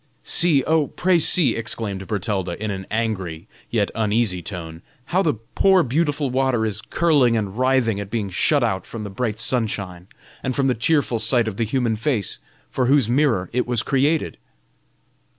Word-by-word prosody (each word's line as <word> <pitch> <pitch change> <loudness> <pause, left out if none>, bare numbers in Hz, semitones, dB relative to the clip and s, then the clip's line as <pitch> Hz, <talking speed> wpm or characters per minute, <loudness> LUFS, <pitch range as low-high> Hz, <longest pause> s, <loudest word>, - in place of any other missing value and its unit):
"See, 160 -6 +3
oh, 155 -2 +2
pray 180 -1 +1
see," 155 -6 +3
exclaimed 105 -4 -3
Bertalda, 100 -4 -2
in 110 0 -3
an 95 -1 -6
angry, 100 -6 -3 0.2
yet 105 -4 0
uneasy 110 -4 0
tone, 80 -2 -7 0.2
"how 180 +6 +1
the 155 -9 +1 0.2
poor 190 -2 +4
beautiful 145 0 0
water 130 -3 +1
is 105 -1 -3
curling 135 -3 +2
and 100 -3 -3
writhing 125 -4 +1
at 100 -1 -6
being 105 -3 -3
shut - - +2
out 95 -2 -1
from 115 -2 -7
the 100 - -6
bright 110 +1 -3
sunshine 100 -7 -2 0.3
and 130 -1 -3
from 140 - +1
the 130 - +3
cheerful 125 -1 +1
sight 115 +1 +4
of 105 -3 -4
the 115 - 0
human 115 0 0
face, 115 -2 -2 0.3
for 125 -2 0
whose 135 -3 +3
mirror 120 -7 +1
it 125 0 0
was 120 -2 0
created!" 145 +4 0
115 Hz, 170 wpm, -22 LUFS, 100-135 Hz, 0.3 s, poor